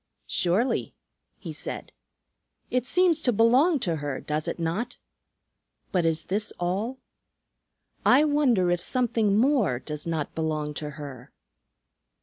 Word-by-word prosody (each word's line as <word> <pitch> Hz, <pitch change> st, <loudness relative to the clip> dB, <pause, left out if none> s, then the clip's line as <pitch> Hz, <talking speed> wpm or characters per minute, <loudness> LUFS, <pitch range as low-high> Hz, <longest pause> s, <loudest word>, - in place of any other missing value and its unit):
"Surely," 190 Hz, +9 st, 0 dB, 0.4 s
he -, -, -7 dB
said. -, -, -5 dB, 0.8 s
"It 250 Hz, 0 st, 0 dB
seems 355 Hz, -2 st, +3 dB
to 250 Hz, -, +3 dB
belong 250 Hz, -, +4 dB
to 170 Hz, -6 st, 0 dB
her, 145 Hz, -2 st, -3 dB
does 150 Hz, 0 st, -3 dB
it -, -, -2 dB
not? 185 Hz, +9 st, -2 dB, 0.9 s
But 180 Hz, -3 st, +1 dB
is 165 Hz, -1 st, 0 dB
this 210 Hz, +3 st, -2 dB
all? 200 Hz, +9 st, -1 dB, 1.1 s
I 270 Hz, +4 st, +6 dB
wonder 265 Hz, -12 st, +3 dB
if 175 Hz, -1 st, 0 dB
something 225 Hz, -5 st, +1 dB
more 235 Hz, -, +3 dB
does 150 Hz, +4 st, -6 dB
not 160 Hz, -3 st, -2 dB
belong 155 Hz, -2 st, -2 dB
to 150 Hz, 0 st, -5 dB
her." 135 Hz, -4 st, -9 dB
195 Hz, 130 wpm, -26 LUFS, 160-250 Hz, 1.1 s, I